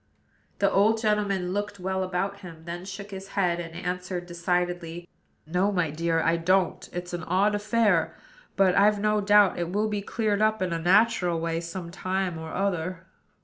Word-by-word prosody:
The 200 Hz, -1 st, +2 dB
old 215 Hz, +3 st, +3 dB
gentleman 205 Hz, -4 st, 0 dB
looked 205 Hz, 0 st, -3 dB
well 190 Hz, +1 st, -2 dB
about 190 Hz, +2 st, -2 dB
him; 165 Hz, -4 st, -11 dB
then 175 Hz, +1 st, -6 dB
shook 200 Hz, +1 st, -8 dB
his 195 Hz, 0 st, -7 dB
head, 175 Hz, -3 st, +2 dB
and 165 Hz, -1 st, -7 dB
answered 180 Hz, 0 st, -4 dB
decidedly: 175 Hz, -1 st, -2 dB, 0.4 s
"No, 180 Hz, +5 st, +1 dB
my 175 Hz, -6 st, 0 dB
dear, 165 Hz, +1 st, 0 dB
I 165 Hz, +1 st, +2 dB
don't. 185 Hz, +2 st, +1 dB
It's 175 Hz, 0 st, -6 dB
an 175 Hz, -, -3 dB
odd 195 Hz, +4 st, +2 dB
affair; 215 Hz, +1 st, +1 dB, 0.4 s
but, 190 Hz, -2 st, +4 dB
I've 205 Hz, +1 st, +4 dB
no 210 Hz, 0 st, +2 dB
doubt, 205 Hz, -2 st, +4 dB
it 170 Hz, 0 st, -2 dB
will 210 Hz, +3 st, +1 dB
be 205 Hz, -1 st, -2 dB
cleared 210 Hz, 0 st, -1 dB
up 215 Hz, 0 st, +2 dB
in 185 Hz, -2 st, -1 dB
a 165 Hz, -, -1 dB
natural 180 Hz, -1 st, +3 dB
way 165 Hz, 0 st, -2 dB
sometime 180 Hz, +1 st, -3 dB
or 160 Hz, 0 st, -7 dB
other." 185 Hz, -2 st, -2 dB
185 Hz, 175 wpm, -26 LUFS, 175-200 Hz, 0.4 s, but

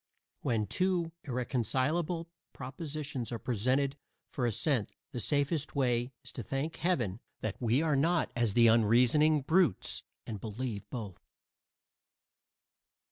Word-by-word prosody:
When 110 Hz, -3 st, +1 dB
two 180 Hz, -, 0 dB
irreconcilable 135 Hz, -, 0 dB, 0.3 s
propositions 140 Hz, -1 st, -5 dB
are 120 Hz, -, -2 dB
presented 130 Hz, +5 st, 0 dB, 0.3 s
for 125 Hz, -3 st, 0 dB
assent 120 Hz, 0 st, 0 dB, 0.2 s
the 125 Hz, -, -4 dB
safest 145 Hz, +4 st, 0 dB
way 125 Hz, -2 st, +1 dB
is -, -, -7 dB
to -, -, -5 dB
thank 135 Hz, -, -3 dB
Heaven 120 Hz, -, 0 dB, 0.2 s
that 110 Hz, +2 st, -4 dB
we 120 Hz, +5 st, +3 dB
are 155 Hz, -3 st, +2 dB
not 165 Hz, +4 st, +2 dB
as 115 Hz, -4 st, +1 dB
the 120 Hz, -, +6 dB
unreasoning 120 Hz, +7 st, +5 dB
brutes, 160 Hz, -, +2 dB, 0.2 s
and 105 Hz, -3 st, -5 dB
believe 110 Hz, -2 st, -4 dB
both. 105 Hz, -7 st, -6 dB
130 Hz, 120 wpm, -32 LUFS, 115-150 Hz, 0.3 s, the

